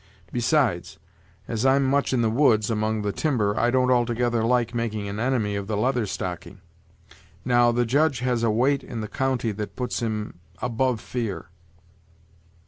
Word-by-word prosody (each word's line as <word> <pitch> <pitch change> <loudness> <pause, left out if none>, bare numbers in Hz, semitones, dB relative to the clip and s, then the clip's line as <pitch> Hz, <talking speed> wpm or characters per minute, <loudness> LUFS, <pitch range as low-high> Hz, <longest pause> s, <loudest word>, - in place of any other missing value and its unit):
Besides, 120 - 0 0.5
as 115 0 -2
I'm 135 +1 +4
much 140 +1 +1
in 125 -3 +1
the 110 - +2
woods, 115 -4 +3
among 110 0 -1
the 105 - 0
timber, 110 -7 0
I 120 - +2
don't 130 0 +2
altogether 120 -1 +1
like 120 0 +1
making 110 -3 -2
an 100 +1 -5
enemy 115 -4 0
of 100 -1 -4
the 105 -1 -2
Leather 120 0 +1
Stocking. 90 +1 -5 0.9
Now, 120 -1 +4
the 120 +1 +1
Judge 145 +3 +2
has 125 -2 0
a 115 - +2
weight 130 +6 +2
in 115 - -6
the 105 - -4
county 130 -2 -1
that 105 0 -6
puts 125 -1 -2
him 110 -6 -4 0.2
above 125 -1 0
fear." 115 -6 -4
120 Hz, 165 wpm, -24 LUFS, 110-125 Hz, 0.9 s, I'm